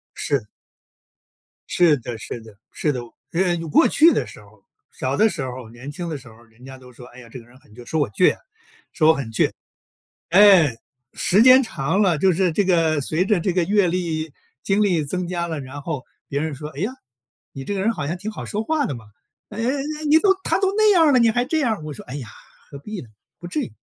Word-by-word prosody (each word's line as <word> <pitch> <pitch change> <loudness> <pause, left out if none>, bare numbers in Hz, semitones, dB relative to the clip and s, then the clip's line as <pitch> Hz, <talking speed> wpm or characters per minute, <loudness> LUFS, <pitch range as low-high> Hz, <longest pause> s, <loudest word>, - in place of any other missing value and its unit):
是。 140 -7 -1 1.2
是 170 -4 +4
的 120 -1 -7
是 115 +2 -7
的 110 -2 -16
是 150 - -1
的， 130 - -4 0.3
呃， 175 0 +1
有 165 -1 -6
过 - - +5
去 325 +3 +5
的 185 - 0
时 105 - -13
候。 105 -1 -21 0.3
小 130 +1 -3
的 220 +8 +4
时 165 - -5
候， 125 -2 -7
年 120 +4 -10
轻 170 +3 -6
的 155 - -4
时 135 -2 -15
候， 115 0 -16
人 115 +2 -19
家 135 0 -10
都 130 -1 -15
说： 125 0 -13
“哎 - - -12
呀， 120 -2 -14
这 130 - -8
个 115 - -16
人 120 +2 -20
很 105 - -23
倔。” 120 +2 -12
说 160 - 0
我 140 - 0
倔 180 - +3
啊， - - -24 0.5
说 155 - +2
我 160 - +7
很 140 -6 -5
倔。 110 - +2 0.8
哎， 180 - +6 0.4
时 190 +3 +2
间 255 +2 +8
长 185 - -1
了， 175 -6 +2
就 190 +4 +3
是 180 +1 +1
这 195 +5 0
个 165 -5 +2
随 160 +6 +1
着 200 -2 +2
这 180 +2 -1
个 180 - +1
阅 200 +2 +2
历、 165 -3 -2 0.3
经 200 +2 +2
历 175 -7 +1
增 180 +5 -3
加 175 -1 -2
了， 160 -3 -4
然 135 +2 -8
后 145 -4 -5 0.2
别 140 - -2
人 155 -1 -3
说： 150 +3 -7
“哎 - - -6
呀， 205 +6 -1 0.6
你 135 - -7
这 205 - -4
个 195 - -2
人 225 +3 +2
好 145 -10 -5
像 170 - -2
挺 210 +4 -6
好 - - -7
说 215 +1 -3
话 310 +3 0
的 140 - -4
嘛， 115 - -12 0.5
哎 210 - -9
哎 230 - 0
哎， 295 +3 -3
你 310 +2 +6
都 385 +3 +4
他 - - +1
都 385 -1 +1
那 430 0 +5
样 345 -4 +5
儿 300 - +4
了， 255 - +5
你 230 -1 +4
还 245 +2 0
这 315 +5 -1
样。 220 - -1
“我 155 - -6
说： - - -11
“哎 125 - -7
呀， 130 - -7 0.4
何 140 - -9
必 210 +7 -7
呢， 125 - -13 0.3
不 175 - -9
至 175 -3 -2
于。” - - -5
165 Hz, 265 characters per minute, -21 LUFS, 135-205 Hz, 1.2 s, 间